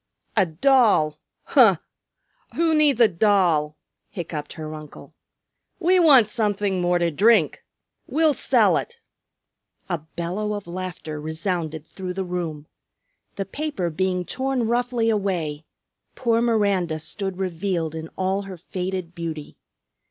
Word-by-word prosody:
"A 200 -5 +4
doll! 185 - +3 0.2
Huh! - - +6 0.8
Who 330 -1 +2
needs 300 -5 +3
a 235 - +7
doll?" 170 -6 +2 0.3
hiccoughed 160 -4 -6
her 155 -1 -7
uncle. 155 -1 -11 0.7
"We 365 +1 +4
want 275 - +7
something 205 -4 -1
more 175 0 +2
to 170 -1 +1
drink. 200 0 +3 0.4
We'll 315 -1 +3
sell - - +3
it 475 -1 -6 0.5
" - - -42
A 170 - 0
bellow 175 +7 -4
of 205 -1 -5
laughter 175 -4 -6
resounded 160 -1 -3
through 185 -2 -7
the 190 -1 -2
room. 170 -4 -4 0.7
The 195 - -3
paper 285 - -3
being 180 +2 -1
torn 265 +2 -1
roughly 240 -1 +1
away, 170 -8 -2 0.5
poor 230 -2 +1
Miranda 200 -8 +1
stood 190 +4 -5
revealed 175 -3 -2
in 160 0 -6
all 190 +1 0
her 195 -2 -8
faded 180 -1 -4
beauty. 165 -3 -6
185 Hz, 130 wpm, -23 LUFS, 165-220 Hz, 0.8 s, a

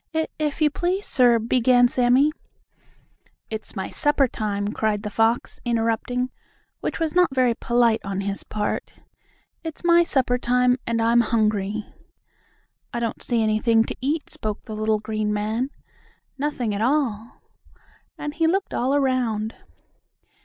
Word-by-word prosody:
"If 320 0 0
if 300 0 -2
you 300 - +4
please, 365 +6 -1
sir," 245 -3 +4
began 245 +2 +4
Sammie. 255 +4 +3 1.2
"It's 220 +1 -5
my 190 - -3
supper 290 -2 +2
time!" 205 -3 -2
cried 215 -1 -1
the 210 - -4
fox, 225 +3 +1
interrupting, 240 +2 -1 0.5
which - - -3
was 320 -2 -1
not 355 -6 +3
very 250 -2 +3
polite 235 -1 +2
on 195 -1 -3
his 200 0 -4
part. 210 -1 -3 0.7
"It's 325 0 -7
my 345 0 +6
supper 260 -6 +1
time, 250 +1 +2
and 230 0 0
I'm 235 +1 +4
hungry." 215 -2 0 1.1
"I 240 - -3
don't 230 -1 -3
see 235 -2 0
anything 220 +1 +3
to - - -5
eat," 295 +4 -1
spoke 215 -9 -4
the 220 - -8
little 215 0 +1
green 215 0 -2
man. 215 +5 -1 0.7
"Nothing 270 -6 -2
at 200 - -2
all," 235 -4 0 0.8
and 295 0 -5
he 325 +1 +1
looked 385 +4 0
all 260 +3 +1
around. 245 -6 0
235 Hz, 145 wpm, -23 LUFS, 215-270 Hz, 1.2 s, my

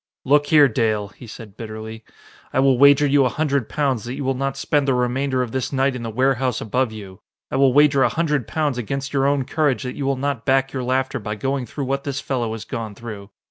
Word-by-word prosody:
"Look 145 +2 +3
here, 150 -2 +6
Dale," 110 -4 0
he 115 +4 -14
said 105 -2 -11
bitterly, 110 0 -8 0.5
"I - - 0
will 135 -2 +3
wager 140 +1 +6
you 140 0 +4
a 130 - +2
hundred 140 -3 -1
pounds 135 -7 0
that 120 +2 -5
you 140 - -4
will 135 0 0
not 135 +1 -3
spend 145 -2 0
the 135 - +2
remainder 130 +1 0
of 120 - -6
this 130 0 -2
night 135 -1 +1
in 125 - -5
the 115 - -4
warehouse 130 +1 +1
above 125 +2 -1
you! 100 -4 -10 0.3
I - - -1
will 135 -1 +5
wager 140 0 +4
a 120 - +4
hundred 150 -2 -1
pounds 150 -5 -1
against 135 +4 -4
your 135 -1 +2
own 140 -2 +1
courage 145 -3 0
that 125 - -4
you 140 - -3
will 135 -1 0
not 140 -3 -2
back 135 +1 +1
your 130 - -2
laughter 130 +1 -1
by 105 0 -4
going 135 +3 -2
through 140 +4 -5
what 135 +1 -2
this 140 -1 -3
fellow 120 -6 -2
has 110 - -7
gone 115 -5 -5
through. 105 -3 -9
130 Hz, 240 wpm, -21 LUFS, 115-140 Hz, 0.5 s, here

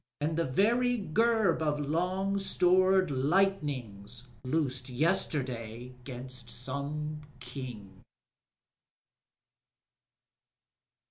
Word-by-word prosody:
And 155 +2 0
the 165 0 +1
very 240 - +2
gerb 215 -1 +2
of 150 -1 0
long 180 +7 0
stored 185 -1 +3
lightnings 130 - 0 0.2
loosed 130 -2 -1
Yesterday 125 - -1
'gainst 125 -1 -5
some 140 +5 -3 0.2
King. 125 -7 -8
145 Hz, 70 wpm, -30 LUFS, 125-185 Hz, 0.2 s, stored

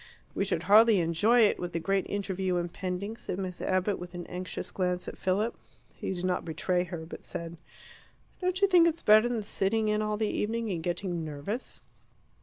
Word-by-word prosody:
"We 195 - 0
should 170 -4 -1
hardly 215 +2 +6
enjoy 175 +9 +3
it, 210 - +4
with 175 -1 -4
the 165 - 0
great 195 +2 0
interview 190 -2 -1
impending," 180 +4 -3
said 180 - -5
Miss 185 -2 -5
Abbott, 185 +2 0
with 180 0 -8
an 175 -1 -5
anxious 180 +1 -5
glance 180 -1 -1
at - - -5
Philip. 205 +5 0 0.4
He - - -4
did 180 -1 -3
not 180 -1 0
betray 175 +2 -1
her, 170 -2 -6
but 160 - -9
said, 170 0 -5 0.9
"Don't 365 0 0
you - - +7
think 350 -3 +6
it's 335 0 -1
better 215 +3 +6
than 230 -3 -2
sitting 215 +2 0
in 210 0 +1
all 210 0 -1
the 220 - 0
evening 220 +1 -1
and 170 -3 -2
getting 175 0 -2
nervous?" 155 - -5
190 Hz, 195 wpm, -29 LUFS, 175-215 Hz, 0.9 s, you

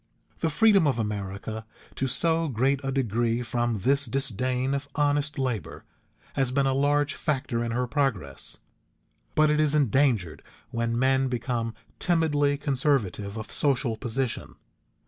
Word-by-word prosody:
The 165 - +1
freedom 200 -1 +5
of 135 - +1
America 105 0 -4 0.3
to 135 - -1
so 165 +5 +1
great 135 +2 +1
a 135 - -1
degree 120 -2 0
from 120 -3 -1
this 140 +4 +2
disdain 130 +1 -1
of 140 +1 -2
honest 145 0 +1
labor 115 - -3 0.5
has 135 -2 +1
been 140 +1 +2
a 135 - +2
large 145 +1 +2
factor 130 -6 -1
in 120 - -2
her 125 +2 0
progress, 120 - -2 0.8
but 155 0 +4
it 150 - +2
is 155 -1 +3
endangered 125 - +2 0.3
when 115 -1 -1
men 130 +1 +3
become 120 -2 -2 0.2
timidly 145 -5 +2
conservative 130 - 0
of 110 - -7
social 130 -5 +2
position. 120 +1 -3
130 Hz, 140 wpm, -27 LUFS, 115-145 Hz, 0.8 s, freedom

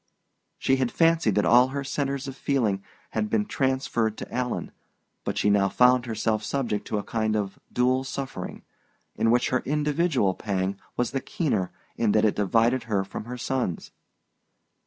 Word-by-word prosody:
She 135 - +2
had 130 -2 0
fancied 165 - +3
that 105 - +3
all 125 +2 +6
her 140 +1 -4
centres 140 0 -2
of 135 - -6
feeling 115 -9 0 0.3
had 110 -1 -1
been 105 -1 +1
transferred 130 -5 0
to - - -8
Alan; 125 -1 -2 0.5
but - - -3
she 105 - +3
now 100 -1 +3
found 125 +3 +4
herself 110 -1 0
subject 120 -5 -2
to 110 - -1
a 100 - -2
kind 110 -1 -1
of 100 -2 -2
dual 130 +1 +2
suffering, 135 0 -6 0.5
in 115 - +2
which 120 +1 +3
her 130 - +2
individual 150 - +1
pang 95 -1 -2 0.2
was 125 - 0
the 135 - -2
keener 110 - -1 0.3
in 110 -3 +2
that 110 0 +4
it 105 - +2
divided 115 +5 +2
her 100 -4 0
from 95 - -7
her 125 +1 -6
son's. 125 -8 -2
120 Hz, 170 wpm, -26 LUFS, 105-130 Hz, 0.5 s, all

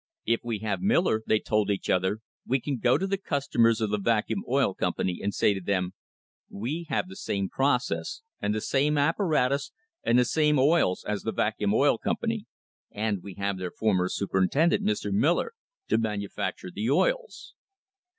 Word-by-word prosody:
"If 115 +1 +2
we 115 -2 -2
have 105 - -1
Miller," 180 - +2
they 110 - +4
told 105 -1 0
each 100 -2 -1
other, 95 +4 +1 0.2
"we 135 +2 +1
can 135 0 -3
go 120 +2 +3
to 195 - -1
the 195 0 -1
customers 135 - +2
of 110 -2 0
the 105 - 0
Vacuum 110 -1 0
Oil 135 -6 +2
Company 90 -1 -1
and 100 - -1
say 100 - +2
to 95 - -5
them: 90 -1 -1 0.6
'We 150 +11 -4
have 155 - 0
the 190 - -10
same 100 - -2
process 135 - 0 0.2
and 105 - 0
the 110 - -2
same 145 +5 +1
apparatus 145 -3 +1 0.3
and 120 - +3
the 125 - +5
same 150 +3 +2
oils 140 - +3
as 105 -1 -1
the - - -2
Vacuum - - 0
Oil - - +3
Company, - - -2 0.4
and 105 -2 -2
we 100 -1 -9
have 100 -1 -2
their 90 -1 -3
former 95 -3 +1
super 95 -1 -1
intendent, 155 - +2
Mr. 105 -1 -1
Miller, 170 - +2 0.4
to - - +3
manufacture 100 -4 -3
the 110 +5 -2
oils.' - - 0
110 Hz, 180 wpm, -27 LUFS, 100-145 Hz, 0.6 s, the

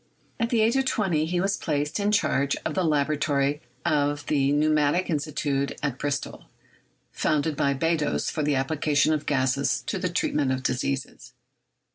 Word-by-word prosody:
At 230 0 0
the 235 -2 +2
age 225 +3 +3
of 265 - +1
twenty 175 -11 0
he 175 +1 -1
was 195 +2 0
placed 150 +3 -2
in 205 +1 +1
charge 140 -9 +1
of 155 - -1
the 185 - 0
laboratory 145 -2 +1 0.2
of 145 -1 +1
the 140 -1 +1
Pneumatic 155 +4 +2
Institute 145 -2 -1
at 140 -4 -2
Bristol, 145 0 -3 0.7
founded 150 0 0
by 140 0 +1
Beddoes 165 +2 0
for 155 - -2
the 145 -1 +1
application 145 +2 +1
of 150 - -3
gases 130 -2 +1
to 190 - -2
the 180 -1 -1
treatment 150 -5 0
of 130 0 -4
diseases. 130 +1 -3
150 Hz, 160 wpm, -25 LUFS, 140-160 Hz, 0.7 s, age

